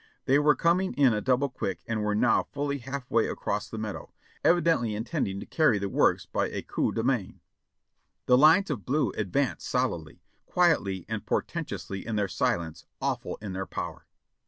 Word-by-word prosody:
They 135 +2 +4
were 150 0 +4
coming 180 +3 +1
in 135 -4 +4
a 105 - -1
double 130 +3 +2
quick 95 -9 -4
and 115 -2 -2
were 105 0 0
now 120 +3 +3
fully 140 0 -2
half 135 0 -6
way 115 -1 +3
across 105 +1 -3
the 110 - -6
meadow, 110 -2 -5 0.3
evidently 165 -11 +3
intending 110 - -2
to - - -7
carry 155 -9 +3
the 100 0 -2
works - - +2
by - - -1
a - - -5
coup - - -1
de - - -2
main. - - -1 0.9
The 125 - +5
lines 160 +7 +6
of 115 -9 -3
blue 145 +4 +1
advanced 120 +7 -1
solidly, 105 -12 -2 0.2
quietly 125 - +2
and - - -4
portentously 95 -1 -3
in 115 0 -3
their 105 -1 +1
silence, 80 -2 -2
awful - - -2
in 100 -3 -5
their 95 +1 -4
power. - - -6
120 Hz, 180 wpm, -28 LUFS, 100-145 Hz, 0.9 s, lines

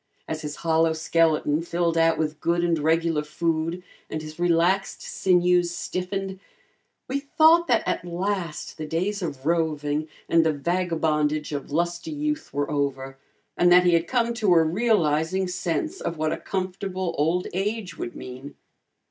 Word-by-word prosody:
As 155 0 -4
his 150 -1 -5
hollow 160 0 +3
skeleton 160 -1 +2
filled 170 0 -1
out 165 0 +3
with 155 -1 -2
good 170 +1 +1
and 170 -2 +1
regular 160 0 +1
food, 165 +3 -2 0.3
and 155 - -3
his 155 +1 -9
relaxed 175 +3 +1
sinews 180 -1 +2
stiffened, 190 +2 -4 0.7
we 275 +2 -1
thought 320 +4 +4
that 235 -4 +2
at - - -1
last 175 -2 -3
the 155 - -4
days 190 +6 -1
of 140 -6 -5
roving 155 -2 0 0.2
and 165 -1 +4
the 160 -1 +2
vagabondage 155 -2 0
of 145 -1 -5
lusty 175 - -1
youth 300 0 -3
were 145 +1 -2
over 135 -2 -2 0.4
and 175 0 +4
that 180 0 +7
he 175 - +4
had 165 0 +2
come 235 -2 +1
to 210 -6 +3
a 165 - +6
realizing 175 -2 +1
sense 180 - -2
of 170 - -3
what 155 0 0
a - - -3
comfortable 185 -1 -3
old 165 +5 +1
age 195 -2 -2
would 120 - -6
mean. 130 +3 -9
170 Hz, 155 wpm, -25 LUFS, 155-185 Hz, 0.7 s, that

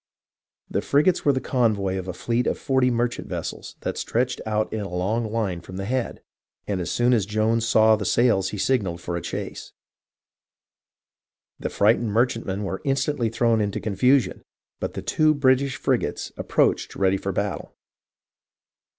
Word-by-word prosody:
The - - -1
frigates 150 +6 +2
were 145 - +6
the 130 - 0
convoy 110 -8 0
of 95 - -7
a 90 - -3
fleet 120 +6 -1
of - - 0
40 130 -2 +2
merchant 120 0 -1
vessels - - -6
that - - -3
stretched 125 +2 -1
out 110 0 -1
in 110 - -2
a 100 - -5
long 105 +6 -1
line 100 -6 -1
from 95 +2 -9
the 95 - -4
Head, 125 +2 -2 0.4
and 100 -3 -2
as 85 - -3
soon 120 +1 +2
as 105 -5 +1
Jones 110 +2 +1
saw 110 -2 +5
the 105 - -4
sails 115 -2 +2
he 105 - -5
signalled 100 -6 0
for 85 0 -4
a 85 - -3
chase. - - -6 1.9
The - - -3
frightened 110 +2 +2
merchantmen 115 -3 0
were 95 -1 -4
instantly 135 -3 0
thrown 115 0 +2
into 100 -1 -1
con 105 -3 -4
fusion, 130 +5 +3 0.4
but - - -4
the - - -5
two 155 0 +3
British 135 -1 +2
frigates - - -1
approached - - +1
ready 95 0 +2
for 100 - -3
battle. 100 +2 -3
110 Hz, 165 wpm, -24 LUFS, 100-125 Hz, 1.9 s, were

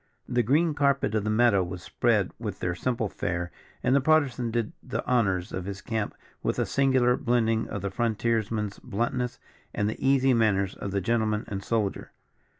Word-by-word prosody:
The 120 0 +2
green 150 +8 +2
carpet 140 -6 +1
of 110 -2 +1
the 110 - -1
meadow 110 -3 +4
was 90 0 -6
spread - - +1
with - - -4
their 90 - -1
simple 115 +4 -1
fair, 85 -2 -3 0.3
and 125 +2 +3
the 140 - +4
Partisan 135 -5 +2
did 115 -1 -1
the 130 - -4
honours 95 -8 +1
of 90 -1 -3
his 100 0 -5
camp 110 +1 -3 0.3
with - - -1
a - - +1
singular 130 -3 +3
blending 115 -4 +1
of 100 - -5
the 100 - -2
frontiers 115 -2 0
man's 105 -3 -3
bluntness, 125 +2 -2 0.4
and 105 - +1
the 110 - -4
easy 135 -1 +4
manners 100 -5 +2
of 100 - -6
the 100 0 -1
gentleman 110 +1 0
and 100 -1 -4
soldier. 105 -3 -2
115 Hz, 185 wpm, -27 LUFS, 100-125 Hz, 0.4 s, meadow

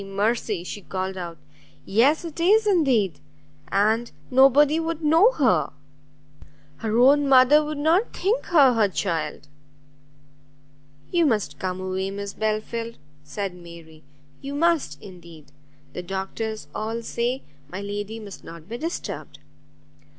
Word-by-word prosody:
mercy!" 205 -1 -1
she 205 +3 -7
called 190 +1 -4
out, 170 -3 -6 0.5
"yes, 275 - +3
it 330 0 -8
is 420 +6 +4
indeed! 255 - +2 0.5
and 220 +4 +1 0.2
nobody 275 +4 +5
would 330 -1 -3
know 325 +10 +5
her! 200 - +2 1.1
her 220 0 -2
own 280 +3 +5
mother 270 +3 +6
would 300 0 -4
not 330 +9 +2
think 425 +7 -1
her 285 -8 +5
her 220 -3 +3
child!" 165 -7 -3 1.6
"You 340 -3 +3
must 215 -7 -1
come 185 0 -3
away, 190 +1 -3
Miss 200 0 -6
Belfield," 225 +2 -3 0.3
said 195 +5 -5
Mary, 170 -3 -13 0.4
"you 275 +1 -6
must 330 0 +1
indeed, 170 -6 -13 0.4
the - - -5
doctors 195 +4 -5
all 225 +2 -4
say 240 +3 -2 0.3
my 185 +4 -6
lady 205 +2 -5
must 205 -3 -10
not 165 -1 -11
be 235 +3 -6
disturbed." 330 +4 -5
220 Hz, 130 wpm, -24 LUFS, 190-290 Hz, 1.6 s, mother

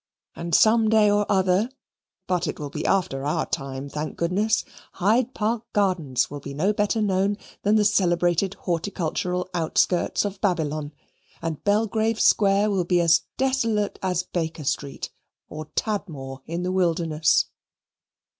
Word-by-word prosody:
And 170 -1 -1
some 220 0 +5
day 215 -2 +5
or 205 0 +1
other 190 +3 +2 0.6
(but 180 -1 0
it - - -4
will 145 -2 -5
be - - -3
after 180 -9 0
our 145 - 0
time, 135 0 -4
thank 150 +2 -5
goodness) 200 +6 +1 0.3
Hyde 230 +7 +1
Park 225 +2 -2
Gardens 180 -11 +1
will 145 - -7
be 140 0 -8
no 190 +8 +1
better 210 +1 0
known 200 0 +1 0.2
than 205 +1 +2
the 210 -1 +3
celebrated 180 -2 +2
horticultural 180 0 -2
outskirts 175 +3 +1
of 200 -1 -5
Babylon, 155 -6 -1 0.5
and 165 -3 -4
Belgrave 220 +1 +1
Square 205 0 +4
will 190 -3 +1
be 175 0 +2
as 170 -1 +4 0.2
desolate 230 -6 0
as 180 -2 0
Baker 160 -3 -4
Street, 140 0 -3 0.4
or 155 0 -7
Tadmor 150 -11 -3
in 170 +2 -3
the 180 - -1
wilderness. 165 -4 +2
185 Hz, 145 wpm, -24 LUFS, 160-205 Hz, 0.6 s, some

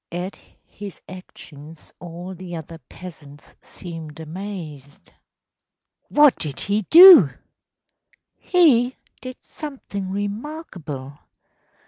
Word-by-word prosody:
At 180 +3 -5 0.3
his 200 -2 -10
actions 160 -4 -12
all 175 +2 -8
the 180 -1 -8
other 165 0 -9
peasants 150 -5 -13
seemed 165 -4 -10
amazed.‚ÄĚ 160 -5 -9 1.0
“What 295 -3 +5
did 145 -4 -4
he 205 +2 0
do?‚ÄĚ 330 - +9 1.0
“He 260 -9 +3 0.3
did 255 -1 -8
something 250 -10 -7
remarkable. 195 - -6
180 Hz, 85 wpm, -22 LUFS, 155-215 Hz, 1.0 s, do?‚ÄĚ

